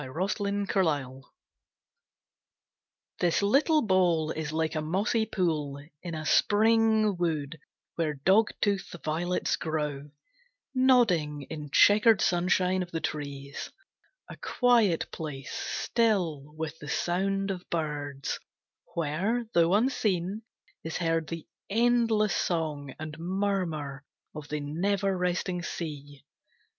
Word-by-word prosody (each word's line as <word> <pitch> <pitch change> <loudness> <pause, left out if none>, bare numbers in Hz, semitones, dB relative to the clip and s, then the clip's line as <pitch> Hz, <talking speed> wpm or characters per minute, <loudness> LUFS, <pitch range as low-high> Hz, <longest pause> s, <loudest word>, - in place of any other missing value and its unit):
The 175 +9 -2
Green 200 0 -1
Bowl 145 -9 -1 1.9
This 175 +3 +2
little 300 +9 +4
bowl 175 -6 +2
is 155 -1 -4
like 160 0 -1
a 155 - -1
mossy 200 +8 0
pool 150 -6 -1 0.2
In 170 -2 -5
a 155 0 -5
Spring 220 +1 +4
wood, 160 -3 -2 0.4
where 155 -3 0
dogtooth 195 +4 +1
violets 170 +4 0
grow 150 -3 -3 0.6
Nodding 210 - +3
in 150 -2 -6
chequered 210 - +6
sunshine 180 +1 +2
of 180 - -4
the 165 - -3
trees; 140 -2 -5 0.6
A - - -10
quiet 230 -9 +2
place, 145 -4 -6
still, 175 - 0
with 160 0 -5
the 150 - -8
sound 195 +4 0
of 180 -2 -7
birds, 145 -4 -3 0.6
Where, 185 +10 0
though 170 +2 +4
unseen, 210 -5 0 0.4
is 160 - -3
heard 165 -2 0
the 165 -2 -6 0.2
endless 230 -1 +3
song 150 -5 -2
And 155 0 -7
murmur 170 -6 -2 0.3
of 150 -1 -8
the 150 0 -3
never 190 +6 0
resting 180 0 -1
sea. 145 -4 -6
170 Hz, 110 wpm, -28 LUFS, 150-200 Hz, 1.9 s, chequered